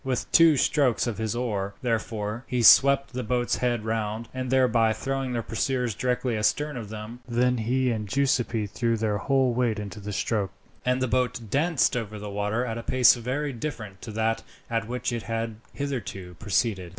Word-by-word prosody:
With 130 -3 -2
two 165 -3 +6
strokes 130 -3 +2
of 115 -4 -3
his 110 0 -2
oar, 100 -5 -2
therefore, 110 -1 -2
he 125 -2 0
swept 140 +3 +6
the 125 - -2
boat's 120 +1 0
head 120 -3 -1
round, 110 0 -2
thereby 125 -3 +2
throwing 135 +1 -3
their 120 -1 -1
pursuers 125 +1 -1
directly 125 +1 -1
astern 145 +7 0
of 115 -4 -6
them; 110 +2 -7
then 125 +1 +2
he 125 +3 +1
and 105 -3 -3
Giuseppi 125 -4 +1
threw 115 +3 -1
their 105 -2 0
whole 135 0 +2
weight 120 -2 +1
into 105 0 -6
the 105 +1 -6
stroke, 100 -1 -1 0.3
and 125 +1 +1
the - - +1
boat 125 0 0
danced 155 -1 +2
over 110 -3 -3
the 105 0 -6
water 105 +4 -1
at 115 -1 -3
a - - -4
pace 125 +1 +5
very 135 +4 -3
different 110 -7 -6
to 110 - -7
that 110 +1 0 0.3
at 115 -1 -1
which 125 0 -2
it 120 - -2
had 115 -1 -3
hitherto 115 -10 -5
proceeded. 100 -2 0
120 Hz, 185 wpm, -26 LUFS, 110-125 Hz, 0.3 s, two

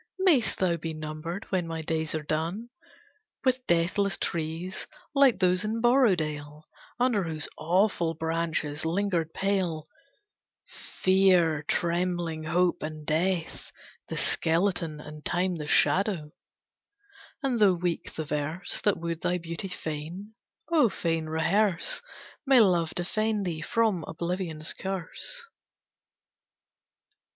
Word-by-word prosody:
Mayst 310 - +3
thou 175 -3 +1
be 160 0 -5
numbered 155 +5 -5
when 180 -3 0
my 165 -1 -3
days 160 0 -1
are 155 - -2
done 165 +10 -2 0.8
With 255 -1 +1
deathless 180 +4 +2
trees 165 +3 -3 0.3
like 275 -4 +5
those 180 +1 +2
in 220 +2 -1
Borrowdale, 160 - +2 0.4
Under 240 -7 +2
whose 155 -2 -3
awful 170 0 +1
branches 160 -2 -1
lingered 170 -1 0
pale 180 -6 -1 0.8
"Fear, 185 -5 +2
trembling 170 -2 -1
Hope, 180 +2 +2
and 155 0 -6
Death, 165 +2 -1 0.4
the - - -4
skeleton, 165 -2 +1
And 150 0 -10
Time 180 0 0
the 150 -1 -5
shadow;" 185 -4 +3 1.1
and 255 -4 +1
though 200 -4 +5
weak 175 -1 -2
the 160 - -3
verse 150 +5 -3
That 205 - +2
would 170 -1 -4
thy 180 0 +1
beauty 170 +2 -5
fain, 175 +4 -6 0.4
oh 300 -8 +5
fain 165 -4 -1
rehearse, 195 - +1 0.4
May 270 -3 +6
Love 175 -6 +3
defend 215 +3 0
thee 165 -3 -3
from 215 -2 +1
Oblivion's 170 -2 -3
curse. 195 - -5
175 Hz, 115 wpm, -28 LUFS, 160-195 Hz, 1.1 s, May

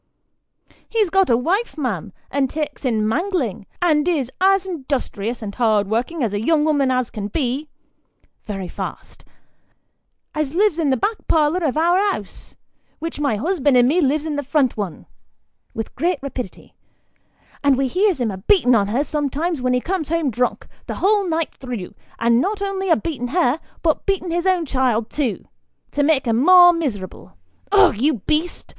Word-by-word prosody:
He's 430 -6 +1
got 385 -1 +3
a 235 - +4
wife, 370 - -1
ma'am, 225 - -3 0.2
as 270 -1 +1
takes 300 -1 -4
in 220 -4 +1
mangling, 275 - -1 0.2
and 310 -2 +3
is 285 -8 0
as 390 0 +4 0.2
'dustrious 235 -4 -3
and 200 -1 -5
hard 215 -4 +2
working 250 +9 -1
a 205 -3 -1
young 300 +6 +2
'ooman 285 -4 +2
as 255 -2 0
can 205 -2 -4
be, 270 +5 -2 0.8
(very 195 -4 -5
fast) - - -8 1.1
as 305 0 -2
lives 400 -3 +2
in 310 -4 +1
the 260 - +2
back 430 - -2
parlour 320 +3 +2
of 300 -2 0
our 345 +3 +3 0.2
'ous, 205 - -12 0.4
which 330 -1 -6
my 280 -6 +1
husband 285 - +1
and 245 0 +5
me 335 +7 +2
lives 295 +1 +1
in 300 -2 -2
the 290 - -2
front 280 -2 +1
one 200 -7 -5 0.7
(with 225 -1 -5
great 350 0 0
rapidity) 255 -7 -7 0.9
and 280 -2 +4
we 270 0 +1
hears 370 - +1
him 235 -4 0
a 190 - -6
beaten' 255 - +3
on 205 -4 +3
her 240 +7 0
sometimes 300 +1 -2
when 250 0 +1
he 250 - +2
comes 340 +1 -3
home 325 -4 0
drunk, 245 +2 -1 0.2
the - - -4
whole 400 -1 +2
night 325 -1 -1
through, 245 -8 -7 0.2
and 235 +1 +3
not 410 +5 -1
only 390 -1 -2
a 325 - +5
beaten' 275 -8 -4
her, 295 0 +1 0.2
but 320 +3 0
beaten' 375 -3 0
his 345 +2 0
own 365 -3 +2
child 255 -5 0
too, 265 -8 -2 0.5
to 290 - 0
make 285 -2 +2
her 230 - +1
more 350 +8 +7
miserable 245 - -5 0.4
ugh, 405 - +5
you 275 +8 +1
beast 315 +3 -1
290 Hz, 175 wpm, -20 LUFS, 245-340 Hz, 1.1 s, more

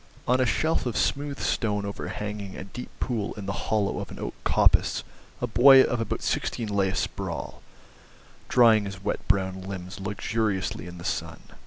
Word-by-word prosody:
On 125 +1 +3
a 130 - +3
shelf 160 +4 +1
of 120 - -2
smooth 140 0 0
stone 105 -3 0
overhanging 100 0 -5
a - - -6
deep 115 +6 -8
pool 115 -5 -2
in 105 - -7
the 100 - -2 0.2
hollow 105 -2 +1
of - - -6
an - - -9
oak - - -4
coppice - - +3 0.4
a - - 0
boy 135 +1 +8
of 120 -2 -1
about 115 - -3
sixteen 115 -3 -1
lay 100 -2 +2
asprawl, 95 - -4 0.9
drying 115 -4 +5
his 100 -1 -7
wet - - -1
brown 95 -1 +1
limbs 95 0 -7
luxuriously 100 -3 -2
in 90 0 -9
the 85 - -9
sun. - - -3
105 Hz, 170 wpm, -26 LUFS, 95-115 Hz, 0.9 s, boy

